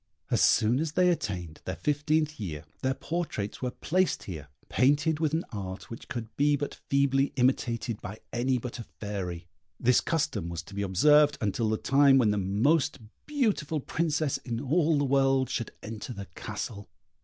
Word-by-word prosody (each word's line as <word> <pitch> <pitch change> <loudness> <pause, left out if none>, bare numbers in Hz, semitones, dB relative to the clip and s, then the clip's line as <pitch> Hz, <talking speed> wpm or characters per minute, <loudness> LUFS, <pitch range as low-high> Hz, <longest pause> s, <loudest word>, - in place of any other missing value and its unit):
As - - +3
soon 115 +3 +4
as 155 -1 -2
they 180 +1 +4
attained 90 - -4
their 95 - -3
fifteenth 150 - 0
year 80 -8 -5 0.2
their 130 0 0
portraits 160 -13 -3
were 125 - 0
placed 185 +8 0
here, 80 -7 -7 0.2
painted 145 +4 +2
with 155 -2 +1
an 165 - -1
art 95 -2 -6
which 115 - -8
could 115 -2 -6
be 145 +1 +3
but 145 0 -3 0.2
feebly 140 0 +3
imitated 120 -3 0
by 105 +1 -7 0.2
any 125 +2 +1
but 120 +1 -6
a - - -4 0.2
fairy. 95 -5 -4 0.3
This 125 +1 +4
custom 155 - -1
was 85 0 -5
to 100 - -13
be 100 - -3
observed 145 +10 +5
until 110 +1 0
the 110 - +1
time 135 +1 +5
when 115 -5 +4
the 105 - 0
most 130 - +2 0.3
beautiful 215 - 0
princess 155 0 0
in 115 -2 -4
all 155 +4 +2
the 145 - +1
world 135 -1 +2
should 115 - -2
enter 110 +3 -6
the 100 -3 -7
castle. 105 0 -6
130 Hz, 175 wpm, -28 LUFS, 105-150 Hz, 0.3 s, observed